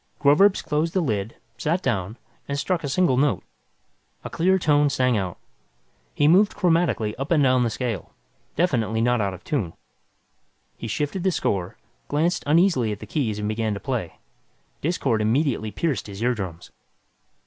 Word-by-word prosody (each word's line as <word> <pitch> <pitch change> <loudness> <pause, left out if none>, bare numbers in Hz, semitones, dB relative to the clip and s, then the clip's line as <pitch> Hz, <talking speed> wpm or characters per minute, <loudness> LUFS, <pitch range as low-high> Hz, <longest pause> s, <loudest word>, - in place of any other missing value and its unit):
Groverzb 185 +8 +4
closed 155 +3 -1
the - - +4
lid, 110 - -2 0.2
sat 170 +5 0
down 110 -3 -1 0.3
and 140 - -2
struck 170 +3 -1
a 145 - -2
single 140 -3 +2
note. 135 - +1 0.8
A - - -7
clear 185 +3 +2
tone 145 -4 +3
sang 125 -3 +1
out. 95 -4 -2 0.8
He 145 - +3
moved 195 +6 +5
chromatically 165 - +1
up 135 - -3
and 155 -4 +3
down 130 -1 +4
the 120 - +1
scale. 115 -5 -4 0.4
Definitely 115 -10 +1
not 120 0 +2
out 100 -2 -1
of - - -15
tune. 105 - -2 1.0
He 115 - -7
shifted 145 - -2
the 190 - +2
score, 95 - -2 0.3
glanced 160 +4 0
uneasily 150 - +3
at 105 - -4
the 110 - -9
keys 110 -3 -2
and 105 0 -3
began 110 -1 -1
to - - -5
play. 120 -10 -4 0.6
Discord 135 -8 0
immediately 115 0 +1
pierced 135 -3 -2
his 100 +2 -6
eardrums. 95 -9 -3
130 Hz, 160 wpm, -24 LUFS, 110-160 Hz, 1.0 s, moved